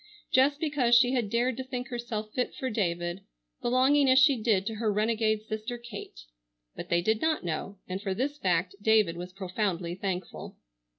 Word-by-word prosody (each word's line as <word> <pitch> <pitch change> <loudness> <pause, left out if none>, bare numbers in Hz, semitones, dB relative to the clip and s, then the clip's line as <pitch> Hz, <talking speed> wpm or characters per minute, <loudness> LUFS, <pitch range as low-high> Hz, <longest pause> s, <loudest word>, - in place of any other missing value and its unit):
Just 280 +3 +4
because 285 -7 +2
she 245 +1 +5
had 240 -5 0
dared 240 +2 0
to 260 - -3
think 255 0 -5
herself 230 -3 -5
fit 250 - -2
for 260 -1 -3
David, 175 -3 -2 0.4
belonging 265 +3 +3
as 260 - +5
she 270 +1 +6
did 210 -4 +2
to 225 - -2
her 220 -1 0
renegade 215 0 +1
sister 220 +3 -5
Kate. 210 - -9 0.5
But - - -7
they 170 0 +2
did 220 +3 +1
not 315 - 0
know, 175 +4 -4
and 185 +1 -4
for 195 -3 -2
this 285 +6 -2
fact 180 -2 +1
David 215 -5 +3
was 180 +1 -7
profoundly 185 -2 -2
thankful. 185 0 -5
220 Hz, 180 wpm, -28 LUFS, 190-250 Hz, 0.5 s, she